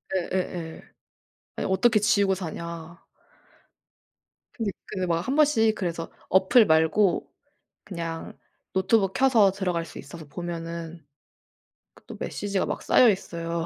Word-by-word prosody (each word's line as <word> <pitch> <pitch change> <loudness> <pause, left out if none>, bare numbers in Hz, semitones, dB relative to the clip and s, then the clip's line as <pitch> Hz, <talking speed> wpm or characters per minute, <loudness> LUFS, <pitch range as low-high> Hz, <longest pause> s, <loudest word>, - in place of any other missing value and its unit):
예예예. 175 -2 -3 0.8
"아니 - - -2
어떻게 220 +3 +4
지우고 200 -2 +3
사냐." 170 -1 -7 1.5
근데 220 -4 -2 0.2
그 185 -3 -3
막 165 -1 +1
1 265 - 0
번씩 270 -8 +4
그래서 170 -4 -4 0.2
어플 190 +5 +5
말고 160 +4 +3 0.6
그냥 165 -3 -6 0.4
노트북 190 +1 +2
켜서 235 -7 +4
들어갈 180 -4 -2
수 - - -11
있어서 160 +3 -10
보면은 165 0 -6 0.9
그 - - -21
또 - - -8
메시지가 200 -2 -2
막 - - -4
쌓여 245 - +6
있어요. 170 -4 -2
185 Hz, 240 characters per minute, -26 LUFS, 165-205 Hz, 1.5 s, 쌓여